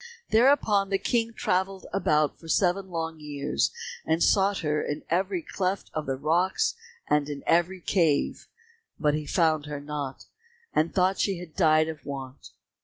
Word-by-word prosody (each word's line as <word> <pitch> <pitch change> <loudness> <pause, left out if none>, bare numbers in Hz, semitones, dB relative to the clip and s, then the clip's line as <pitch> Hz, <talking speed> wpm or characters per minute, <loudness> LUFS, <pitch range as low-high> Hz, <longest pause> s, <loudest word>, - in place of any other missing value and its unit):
Thereupon 220 -5 +4
the 195 - +2
King 230 +3 0
travelled 190 -2 -1
about 155 -6 +1
for 165 - -13
seven 185 +3 +1
long 165 -2 -4
years, 145 -1 -1 0.3
and 160 +1 +1
sought 200 0 +3
her 150 0 +1
in 145 +1 -4
every 185 0 0
cleft 190 +3 -2
of 155 -2 -3
the 135 - 0
rocks 165 +7 +1 0.3
and 150 -1 +1
in 145 -1 -6
every 175 +2 +2
cave, 165 -6 +1 0.5
but 150 -2 +2
he 150 -1 -3
found 155 -3 +2
her 145 -1 -4
not, 145 -2 -5 0.5
and 155 +2 +2
thought 190 0 +2
she 195 -3 +1
had 170 -3 -10
died 155 -3 +4
of 160 -2 -7
want. 135 -2 -7
165 Hz, 160 wpm, -27 LUFS, 150-190 Hz, 0.5 s, Thereupon